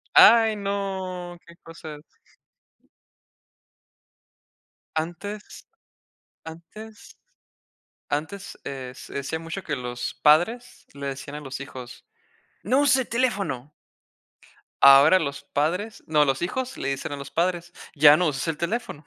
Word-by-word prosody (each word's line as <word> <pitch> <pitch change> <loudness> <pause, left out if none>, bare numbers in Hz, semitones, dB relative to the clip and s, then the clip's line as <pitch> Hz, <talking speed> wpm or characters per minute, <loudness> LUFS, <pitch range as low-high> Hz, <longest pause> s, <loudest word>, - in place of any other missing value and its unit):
Ay, 225 -2 +8
no 190 -3 -4
que 170 - -15
cosas. 160 -2 -10 3.0
Antes, 195 +6 -5 0.8
antes, 190 +7 -12 0.9
antes, 160 +7 -4
eh, 130 -2 -6
se - - -11
decía 140 +3 -3
mucho 165 +4 -6
que 150 - -2
los 125 -1 -5
padres 180 +12 +2
le 140 0 -6
decían 140 +2 -6
a 150 - -6
los 135 -1 -7
hijos: 130 -3 -10 0.6
"¡No 255 +7 +2
uses 285 -2 +4
el 260 - -2
teléfono!". 200 - -1 1.1
Ahora 140 +7 +8
los 140 -4 -4
padres 180 +10 -2
no, 150 -1 +4
los 135 +2 0
hijos 255 +8 -3
le - - -4
dicen 135 +1 -4
a 145 - -4
los 140 - -9
padres: 175 0 -1 0.2
"!Ya 145 0 +8
no 175 +2 +1
uses 145 +1 -2
el 160 -2 -2
teléfono!". 170 -4 -4
165 Hz, 125 wpm, -25 LUFS, 140-200 Hz, 3.0 s, Ay